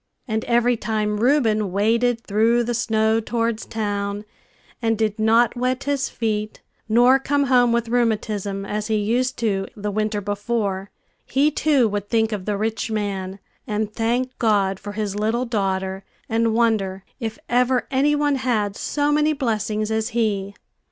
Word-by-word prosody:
And 220 Hz, -1 st, -1 dB
every 240 Hz, 0 st, +2 dB
time 210 Hz, -1 st, -1 dB
Reuben 225 Hz, -6 st, +2 dB
waded 230 Hz, +4 st, +1 dB
through 225 Hz, +3 st, +2 dB
the 240 Hz, +1 st, -2 dB
snow 220 Hz, -1 st, +1 dB
towards 230 Hz, 0 st, -2 dB
town, 205 Hz, -1 st, -3 dB, 0.6 s
and 225 Hz, -1 st, +1 dB
did 215 Hz, 0 st, -1 dB
not 225 Hz, +3 st, +3 dB
wet 255 Hz, +2 st, -1 dB
his 280 Hz, -1 st, -1 dB
feet, 215 Hz, -2 st, -2 dB, 0.3 s
nor 245 Hz, +4 st, +5 dB
come 285 Hz, +1 st, +1 dB
home 250 Hz, -3 st, +4 dB
with 235 Hz, 0 st, 0 dB
rheumatism, 215 Hz, -4 st, -1 dB
as 210 Hz, +1 st, -3 dB
he 220 Hz, -, +1 dB
used 240 Hz, +5 st, 0 dB
to 200 Hz, -4 st, -1 dB
the 210 Hz, 0 st, -3 dB
winter 215 Hz, 0 st, -1 dB
before, 205 Hz, -1 st, -2 dB, 0.3 s
he, 285 Hz, +3 st, +2 dB
too, 285 Hz, -5 st, +3 dB
would 205 Hz, -1 st, -3 dB
think 225 Hz, -1 st, +2 dB
of 200 Hz, -3 st, -4 dB
the 210 Hz, -1 st, -1 dB
rich 220 Hz, +2 st, -2 dB
man, 195 Hz, -3 st, -3 dB, 0.3 s
and 215 Hz, -1 st, -2 dB
thank 245 Hz, +3 st, -1 dB
God 200 Hz, -4 st, +2 dB
for 205 Hz, 0 st, -7 dB
his 205 Hz, -2 st, -3 dB
little 220 Hz, +4 st, 0 dB
daughter, 190 Hz, -4 st, -2 dB, 0.2 s
and 225 Hz, 0 st, +1 dB
wonder 205 Hz, -5 st, +1 dB, 0.2 s
if 225 Hz, -3 st, -4 dB
ever 250 Hz, +1 st, +2 dB
any 285 Hz, +3 st, +3 dB
one 290 Hz, -1 st, +1 dB
had 220 Hz, -6 st, 0 dB
so 290 Hz, +4 st, 0 dB
many 300 Hz, +1 st, +3 dB
blessings 215 Hz, -5 st, -1 dB
as 220 Hz, +1 st, 0 dB
he. 200 Hz, -3 st, 0 dB
220 Hz, 160 wpm, -22 LUFS, 205-240 Hz, 0.6 s, nor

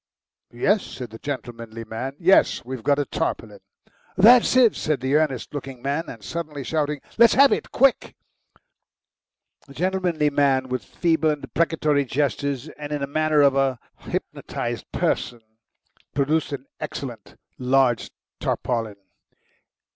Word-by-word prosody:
"Yes," 200 Hz, -, +2 dB
said 125 Hz, -4 st, -8 dB
the 110 Hz, -, -10 dB
gentlemanly 115 Hz, -4 st, -6 dB
man. 120 Hz, +5 st, -5 dB
"Yes. 180 Hz, -6 st, +3 dB
We've 130 Hz, -1 st, -6 dB
got 140 Hz, +5 st, +2 dB
a 145 Hz, -, 0 dB
tarpaulin." 105 Hz, -6 st, -3 dB, 0.6 s
"That's 235 Hz, +6 st, +6 dB
it," 245 Hz, -5 st, +5 dB
said 155 Hz, -2 st, -1 dB
the 130 Hz, +2 st, -1 dB
earnest 150 Hz, -5 st, 0 dB
looking 135 Hz, -3 st, -6 dB
man, 140 Hz, +6 st, -2 dB
suddenly 150 Hz, +4 st, -5 dB
shouting. 150 Hz, 0 st, -1 dB, 0.2 s
"Let's 235 Hz, -1 st, +7 dB
have 275 Hz, +1 st, +7 dB
it, -, -, -1 dB
quick!" 275 Hz, 0 st, +2 dB, 1.5 s
The 140 Hz, -, -14 dB
gentlemanly 180 Hz, -4 st, 0 dB
man, 135 Hz, -2 st, +2 dB
with 125 Hz, -3 st, -2 dB
feeble 160 Hz, -, +1 dB
and 150 Hz, -2 st, -2 dB
deprecatory 155 Hz, -4 st, +1 dB
gestures, 140 Hz, +1 st, -1 dB
and 145 Hz, 0 st, -6 dB
in 150 Hz, -1 st, -2 dB
the -, -, 0 dB
manner 155 Hz, +1 st, +2 dB
of 140 Hz, -1 st, +4 dB
a 135 Hz, -2 st, +1 dB, 0.2 s
hypnotised -, -, -5 dB
person, 120 Hz, -2 st, -1 dB, 0.7 s
produced 145 Hz, +3 st, +1 dB
an 140 Hz, -1 st, -5 dB
excellent -, -, -7 dB, 0.2 s
large 130 Hz, -2 st, +2 dB, 0.3 s
tarpaulin. 115 Hz, -4 st, -2 dB
140 Hz, 130 wpm, -23 LUFS, 130-155 Hz, 1.5 s, Let's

